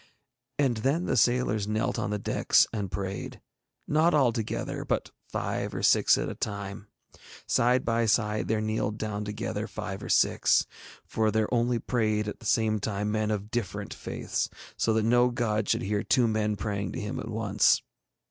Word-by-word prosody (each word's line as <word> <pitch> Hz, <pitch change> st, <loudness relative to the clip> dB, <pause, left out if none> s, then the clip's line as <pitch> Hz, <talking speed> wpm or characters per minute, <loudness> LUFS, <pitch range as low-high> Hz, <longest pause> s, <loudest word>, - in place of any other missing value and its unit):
And 135 Hz, -5 st, +2 dB
then 140 Hz, +10 st, 0 dB
the -, -, 0 dB
sailors 120 Hz, -4 st, +2 dB
knelt 110 Hz, +1 st, -1 dB
on -, -, -2 dB
the 105 Hz, -, -1 dB
decks 100 Hz, -, +3 dB
and 100 Hz, -4 st, -2 dB
prayed, 95 Hz, +1 st, -4 dB, 0.5 s
not 155 Hz, +2 st, +3 dB
all 135 Hz, -5 st, +4 dB
together, 110 Hz, -3 st, -3 dB
but -, -, -2 dB, 0.2 s
five -, -, -3 dB
or -, -, -3 dB
six -, -, +5 dB
at -, -, -2 dB
a -, -, -4 dB
time. 100 Hz, -1 st, -5 dB, 0.6 s
Side 125 Hz, +2 st, +2 dB
by 115 Hz, 0 st, +1 dB
side 105 Hz, -1 st, +1 dB
there 110 Hz, -1 st, 0 dB
kneeled 110 Hz, -1 st, -1 dB
down 105 Hz, -1 st, -3 dB
together 105 Hz, 0 st, -3 dB
five 100 Hz, -1 st, -6 dB
or -, -, -7 dB
six, -, -, +3 dB, 0.4 s
for 110 Hz, -1 st, 0 dB
there 110 Hz, +2 st, 0 dB
only 120 Hz, 0 st, +2 dB
prayed 110 Hz, -3 st, 0 dB
at 105 Hz, -, -5 dB
the 115 Hz, -, -7 dB
same 110 Hz, +1 st, +2 dB
time 105 Hz, 0 st, -2 dB
men 110 Hz, 0 st, 0 dB
of 105 Hz, 0 st, -3 dB
different 115 Hz, -6 st, -3 dB
faiths, -, -, -3 dB, 0.3 s
so 115 Hz, -, +1 dB
that 110 Hz, 0 st, +2 dB
no 120 Hz, +2 st, +4 dB
god 110 Hz, -3 st, -1 dB
should -, -, +1 dB
hear 100 Hz, +1 st, 0 dB
two 120 Hz, 0 st, +3 dB
men 110 Hz, -1 st, 0 dB
praying 100 Hz, -1 st, -3 dB
to -, -, -4 dB
him 105 Hz, -, -4 dB
at 110 Hz, -, -6 dB
once. 110 Hz, -2 st, +2 dB
110 Hz, 180 wpm, -28 LUFS, 105-115 Hz, 0.6 s, six